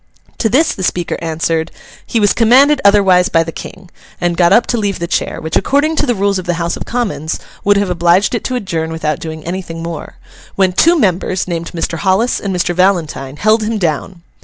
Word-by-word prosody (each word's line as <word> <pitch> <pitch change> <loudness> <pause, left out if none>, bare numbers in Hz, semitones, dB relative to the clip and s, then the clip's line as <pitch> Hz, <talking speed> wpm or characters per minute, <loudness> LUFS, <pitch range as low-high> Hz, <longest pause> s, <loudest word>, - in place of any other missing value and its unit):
To 225 - +1
this 300 +8 +2
the - - -8
Speaker 175 -2 -1
answered, 165 0 -1 0.4
'he 230 - 0
was 205 -2 +3
commanded 265 +5 +4
otherwise 195 -3 +4
by 165 - +3
the 165 - -6
King,' 185 +2 -10 0.3
and 175 -1 0
got 170 0 +3
up 235 - +5
to 240 - -1
leave 200 -3 -1
the 170 - -3
chair—which, 160 -2 -3
according 295 +4 +1
to - - +1
the 245 - +1
rules 200 -1 0
of 185 - -7
the 175 - 0
House 170 0 -2
of - - -7
Commons 205 -10 -3 0.2
would 205 0 +3
have 200 -2 0
obliged 175 +4 +2
it 235 - -2
to 255 - -2
adjourn 165 -8 -3
without 155 -2 -2
doing 160 -1 -7
anything 170 -2 -5
more—when 180 +3 -4
two 335 - +4
members, 185 - 0
named 170 -1 -4
Mr. 165 -1 -3
Hollis 200 +6 +1
and 200 - -4
Mr. 175 -1 0
Valentine, 165 -7 0
held 215 +4 +2
him 215 +1 -1
down. 170 0 -3
185 Hz, 205 wpm, -15 LUFS, 165-210 Hz, 0.4 s, up